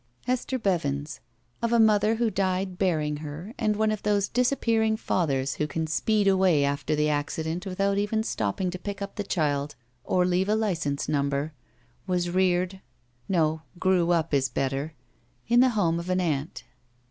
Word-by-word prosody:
Hester 255 +1 -1
Bevins, 150 - -1 0.4
of 235 - 0
a 235 - +4
mother 215 0 +4
who 230 -1 0
died 185 -1 -1
bearing 155 -6 +1
her 155 +8 -7
and 215 -1 +1
one 215 +1 +1
of 215 - -3
those 205 -1 +1
disappearing 230 -3 +1
fathers 135 - 0
who 150 - 0
can 160 +1 -2
speed 205 +6 +1
away 190 -6 +4
after 140 +2 -1
the 150 0 +1
accident 160 +4 -2
without 195 +1 0
even 220 +2 0
stopping 175 - -1
to 185 - -6
pick 200 +2 -5
up 200 0 -5
the 205 - -2
child 145 -6 -1 0.3
or 180 -1 +2
leave 180 +2 +1
a 215 - +3
license 165 -10 -1
number, 140 +1 -1 0.5
was 175 -1 0
reared 185 +1 +1 0.3
— 120 0 -38
^no, 160 -3 +1 0.2
grew 180 -1 +2
up, 165 -3 +1
is 135 -2 +2
better 135 +4 -2 0.3
— - - -23
^in 240 +1 +6
the 260 - +5
home 170 -4 +2
of 170 +2 -6
an 185 0 +1
aunt. 155 -4 -2
180 Hz, 175 wpm, -26 LUFS, 150-205 Hz, 0.5 s, ^in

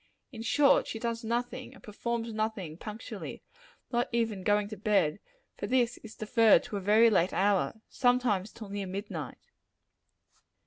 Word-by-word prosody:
In 230 -4 -8
short, 275 +5 +4
she - - -4
does 230 +1 -3
nothing, 245 +2 -3
and - - -17
performs 230 +2 -3
nothing, 215 -7 -3
punctually, 210 +5 -7 0.5
not 240 0 0
even 225 -4 0
going 205 +1 +2
to 215 - -6
bed; 205 -6 +1 0.4
for - - -4
this 245 -2 +1
is 225 -1 -12
deferred 225 0 +4
to 220 -4 -5
a - - -4
very 220 +4 +5
late 185 -3 +2
hour 195 -2 +1
sometimes 245 -6 +1
till 215 -3 -10
near 200 -1 -4
midnight. 185 - -6
220 Hz, 150 wpm, -30 LUFS, 200-235 Hz, 0.5 s, very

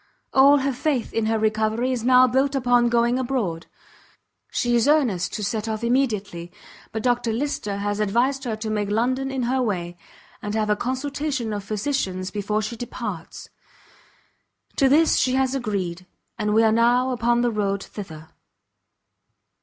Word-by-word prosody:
All 275 +2 +6
her 275 0 0
faith 255 -1 -1
in 225 -1 0
her 225 0 +1
recovery 220 +3 0
is 245 -3 -2
now 255 +1 +6
built 265 +3 +1
upon 245 -2 +3
going 235 +1 +2
abroad; 235 -11 -2 0.8
she 240 0 0
is 235 +2 +2
earnest 245 - +2
to 210 - -4
set 215 +1 -2
off 220 +1 -3
immediately; 210 -9 -1 0.4
but 220 -1 -4
Dr 245 -2 +1
Lyster 225 -5 -2
has 205 +1 -2
advised 245 +6 +1
her 225 -3 -2
to 215 0 -4
make 205 -1 -1
London 255 +5 0
in 265 -2 -2
her 255 +2 0
way, 175 -7 -2 0.5
and 205 0 -4
have 215 -1 0
a - - +3
consultation 265 0 -3
of 205 -1 -4
physicians 195 -4 -2
before 210 +1 -1
she 235 +3 -4
departs. 240 +1 -7 1.3
To 270 - +4
this 315 +4 +4
she 255 0 +2
has 265 0 +1
agreed; 190 -8 -3 0.3
and 210 -1 -1
we 225 - +5
are 220 - +4
now 240 +3 +3
upon 240 -1 +1
the 240 -1 +1
road 200 -2 -1
thither. 160 -6 -9
235 Hz, 160 wpm, -23 LUFS, 210-255 Hz, 1.3 s, All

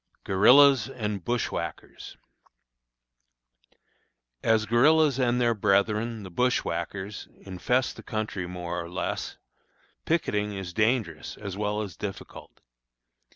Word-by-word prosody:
GUERILLAS 130 +5 +6
AND 105 -5 -4
BUSHWHACKERS. 120 +2 -4 2.2
As 110 -1 +2
guerillas 140 +4 +4
and 125 -1 +2
their 120 -1 +3
brethren, 105 +2 +1
the 95 - -9
bushwhackers, 100 -2 -2
infest 110 +7 -1
the - - -9
country 110 -5 -4
more 90 -1 -4
or 85 - -9
less, 90 - -4 0.7
picketing 105 -11 0
is 95 -2 -6
dangerous 110 - -1
as 100 -3 -6
well 105 +1 -1
as 95 -5 -8
difficult. 100 0 -8
105 Hz, 105 wpm, -27 LUFS, 95-120 Hz, 2.2 s, GUERILLAS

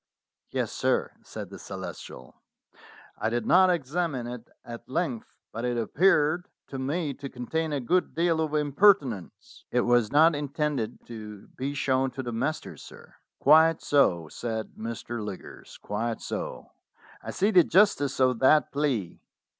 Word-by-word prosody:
"Yes, - - -2
sir," - - 0
said - - -8
the - - -9
Celestial. 65 - -9 0.8
"I - - 0
did 120 -1 -2
not 185 +1 +5
examine 160 -4 -1
it 120 -1 -8 0.2
at 120 0 -9
length, 135 -6 -3
but 115 - -5
it 120 -1 -1
appeared 155 - +2 0.2
to 135 - -5
me 145 +3 -2
to 140 +1 -8
contain 155 +6 -3
a 145 - -1
good 180 +9 0
deal 165 -1 +2
of 155 -1 -1
impertinence." 145 - +1
"It 125 - +2
was 120 -3 +2
not 160 +3 +6
intended 145 -5 -3
to 105 -3 -10
be 140 +2 -5
shown 135 -1 +1
to 130 - -3
the 120 -1 -5
masters, 155 +7 -3
sir." - - -14 0.2
"Quite 160 +3 +5
so," 85 - +2
said 110 +5 -5
Mr. 115 0 -5
Liggers 100 -3 -9
"quite 110 +2 -3
so. - - -6 0.5
I - - -8
see 205 +3 +1
the 180 -4 +7
justice 160 -9 +3
of 130 -2 +3
that 150 +3 +4
plea. 135 - -2
135 Hz, 150 wpm, -27 LUFS, 120-160 Hz, 0.8 s, the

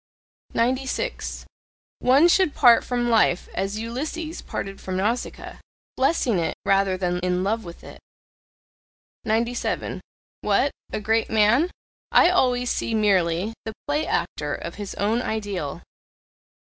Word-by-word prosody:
96. 255 +3 -1 0.5
One 270 +7 +5
should 350 -3 +3
part 240 -4 +6
from 240 -1 -1
life 215 -5 +3
as 195 +2 -2
Ulysses 305 +8 -4
parted 195 0 -6
from 185 -1 -3
Nausicaa 220 +6 -3 0.4
blessing 260 - +2
it 165 - -1
rather 195 -1 +2
than 180 -1 -1
in 180 0 0
love 220 +3 0
with 170 -1 -11
it. - - -11 1.3
97. 235 +2 -1 0.4
What? - - +2 0.2
A - - -2
great 220 +2 +1
man? 225 +10 +4 0.4
I 350 - +6
always 250 -7 +2
see 225 - -1
merely 195 -1 +2
the 220 - -5
play 295 +2 0
actor - - -1
of - - -6
his 200 - -6
own 220 +4 +1
ideal. 205 - -4
225 Hz, 125 wpm, -24 LUFS, 195-250 Hz, 1.3 s, part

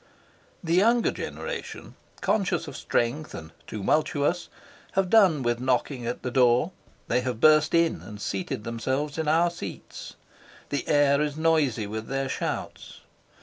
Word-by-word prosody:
The 165 -1 -1
younger 230 +6 +4
generation, 485 -1 -6 0.3
conscious 190 -5 0
of - - -8
strength 135 +7 -1
and 80 0 -9 0.2
tumultuous, 145 - 0 0.4
have 190 -1 +1
done 185 -11 +5
with 120 0 0
knocking 125 0 -1
at 120 - -4
the 125 - -3
door; 125 +5 +3 0.4
they 125 +2 +1
have 125 -3 -3
burst 155 +3 +5
in 170 -1 +2
and 105 -1 -10
seated 100 +1 -3
themselves 130 +7 -2
in 160 - -1
our 165 +3 +3
seats. 175 - -8 0.5
The 145 - -3
air 145 -1 +4
is 150 0 -2
noisy 155 -9 +2
with 110 +2 -5
their 135 0 -2
shouts. - - -5
145 Hz, 145 wpm, -26 LUFS, 120-165 Hz, 0.5 s, done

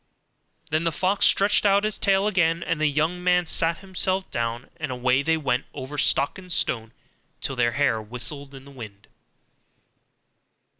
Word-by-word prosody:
Then 155 +2 +1
the 165 - +1
fox 190 +5 +2
stretched 200 +1 +3
out 200 0 +3
his 215 0 +1
tail 195 0 +2
again, 170 -5 +1
and 155 - -2
the 155 - +3
young 155 +5 -1
man 180 -1 +3
sat 165 0 0
himself 190 0 -1
down, 115 0 -3
and 155 -5 -4
away 125 +1 +1
they 160 +3 +1
went 130 -4 -1
over 145 +1 -6
stock 140 +5 +2
and 180 -1 -11
stone 115 -8 -1 0.5
till 135 - -3
their 120 -1 +1
hair 130 -6 +1
whistled 125 +5 -3
in 135 0 -12
the 140 - -13
wind. 110 -7 -11
150 Hz, 165 wpm, -24 LUFS, 125-180 Hz, 0.5 s, stretched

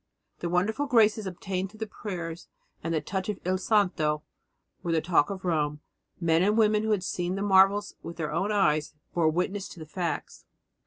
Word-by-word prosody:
The 170 - -2
wonderful 215 +11 +1
graces 220 -4 +4
obtained 185 +1 -3
through 215 - -16
the 220 - -3
prayers 175 -5 -6 0.4
and 165 - -2
the 160 -2 +1
touch 190 +1 -3
of 205 - -2
Il 185 +1 +1
santo 180 -7 +1 0.6
were 170 - -2
the 165 - +3
talk 160 -2 +2
of 190 -2 -6
Rome; 150 -3 0 0.4
men 165 -1 +3
and 210 +4 +3
women 215 -1 +4
who 220 - -2
had 205 -4 +1
seen 180 0 -2
the 195 - -2
marvels 200 +1 +4
with 170 - -8
their 155 -3 -2
own 190 +6 0
eyes 155 -7 +2 0.2
bore 165 -2 +3
witness 190 +5 -1
to - - -11
the 160 - -7
facts. 170 +2 -4
185 Hz, 195 wpm, -28 LUFS, 165-205 Hz, 0.6 s, graces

